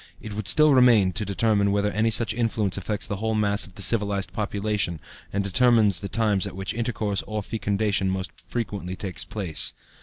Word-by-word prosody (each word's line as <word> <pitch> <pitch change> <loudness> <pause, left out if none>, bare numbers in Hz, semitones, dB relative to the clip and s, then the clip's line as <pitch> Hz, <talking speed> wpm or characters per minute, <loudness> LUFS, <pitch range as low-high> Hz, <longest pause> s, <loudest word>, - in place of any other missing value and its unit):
It 110 - -8
would 105 0 -5
still 150 +5 +5
remain, 120 -7 +5
to 110 - -2
determine 100 +1 +1
whether 100 +1 0
any 110 +2 +1
such 115 0 +2
influence 110 -4 -1
affects 100 +2 -2
the 100 - -3
whole 110 +2 -2
mass 100 -1 +1
of 95 - -19
the 100 - 0
civilized 100 -1 +1
population 105 -4 -2 0.3
and 100 0 -1
determines 110 0 +4
the 100 - -6
times 105 -4 0
at - - -9
which 95 0 -3
intercourse, 110 -4 -2
or 105 0 -3
fecundation, 100 -2 -1
most 95 0 -3
frequently 100 -6 -5
takes 95 -1 -4
place. 90 -8 -1
105 Hz, 185 wpm, -24 LUFS, 100-110 Hz, 0.3 s, still